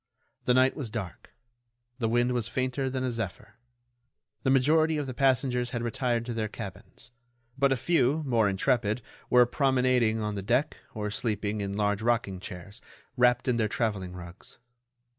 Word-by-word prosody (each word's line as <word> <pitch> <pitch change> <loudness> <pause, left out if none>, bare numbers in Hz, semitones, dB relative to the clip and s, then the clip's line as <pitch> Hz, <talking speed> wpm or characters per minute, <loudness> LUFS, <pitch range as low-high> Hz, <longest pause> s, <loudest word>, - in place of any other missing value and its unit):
The 125 - +3
night 130 +1 +4
was 135 -7 -5
dark; 105 -5 -6 0.7
the 115 -2 0
wind 120 +2 +2
was 120 -3 -1
fainter 130 +2 -1
than 130 0 -2
a 130 - 0
zephyr. 115 0 -6 0.8
The - - 0
majority 155 +4 +3
of 145 - -2
the 130 - -5
passengers 125 -1 +1
had 120 -1 -3
retired 120 0 -1
to 120 - -4
their 110 -1 -1
cabins; 105 +4 -10 0.4
but 140 0 +2
a 135 - +2
few, 145 +1 +2
more 115 -6 +3
intrepid, 110 +2 0 0.3
were 125 0 +6
promenading 125 -4 +2
on 105 -1 -2
the 100 - -4
deck 120 +8 0 0.2
or 105 -1 -3
sleeping 105 -2 -1
in 100 0 -3
large 105 0 +1
rocking 115 -5 0
chairs, 95 +4 -8 0.3
wrapped 125 0 +3
in 125 -2 +2
their 110 -2 +2
travelling 105 -5 -2
rugs. 85 0 -10
120 Hz, 165 wpm, -28 LUFS, 105-130 Hz, 0.8 s, were